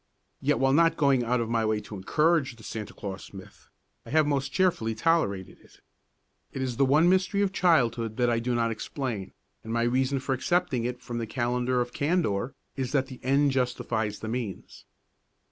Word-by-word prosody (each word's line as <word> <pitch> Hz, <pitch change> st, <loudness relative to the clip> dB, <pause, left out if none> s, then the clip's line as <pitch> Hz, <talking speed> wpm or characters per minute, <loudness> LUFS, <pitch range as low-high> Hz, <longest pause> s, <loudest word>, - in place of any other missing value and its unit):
Yet, -, -, +2 dB
while 135 Hz, +2 st, +2 dB
not 165 Hz, +2 st, +4 dB
going 140 Hz, -4 st, +3 dB
out 120 Hz, +1 st, +1 dB
of 115 Hz, -, -2 dB
my 115 Hz, -1 st, +1 dB
way 110 Hz, -1 st, +1 dB
to 105 Hz, -, -9 dB
encourage 150 Hz, -, +1 dB
the 110 Hz, -, -16 dB
Santa 110 Hz, -2 st, -6 dB
Claus 100 Hz, -1 st, -8 dB
myth, 95 Hz, -, -13 dB, 0.3 s
I -, -, -13 dB
have 155 Hz, +1 st, +3 dB
most 140 Hz, -2 st, -1 dB
cheerfully 140 Hz, -13 st, +1 dB
tolerated 110 Hz, -, 0 dB
it. -, -, -22 dB, 0.7 s
It 135 Hz, -, -3 dB
is 125 Hz, -3 st, -3 dB
the 135 Hz, -, +4 dB
one 150 Hz, +6 st, +4 dB
mystery 190 Hz, +2 st, +2 dB
of 195 Hz, -, 0 dB
childhood 120 Hz, -, +2 dB
that 125 Hz, -1 st, +2 dB
I 120 Hz, -1 st, +2 dB
do 120 Hz, +1 st, -1 dB
not 115 Hz, -1 st, +1 dB
explain, 115 Hz, -4 st, -4 dB, 0.3 s
and 110 Hz, -, -7 dB
my 115 Hz, 0 st, +1 dB
reason 130 Hz, +3 st, +1 dB
for 135 Hz, +1 st, -2 dB
excepting 130 Hz, -2 st, 0 dB
it 125 Hz, 0 st, -4 dB
from 120 Hz, -1 st, -4 dB
the 115 Hz, -, -3 dB
calendar 125 Hz, +2 st, 0 dB
of 120 Hz, 0 st, -4 dB
candour 140 Hz, -, 0 dB, 0.2 s
is 130 Hz, -3 st, -3 dB
that 135 Hz, -2 st, +2 dB
the 130 Hz, -, -9 dB
end 140 Hz, +2 st, +3 dB
justifies 120 Hz, -5 st, -1 dB
the 110 Hz, -, -5 dB
means. 115 Hz, -5 st, -5 dB
125 Hz, 195 wpm, -27 LUFS, 115-140 Hz, 0.7 s, not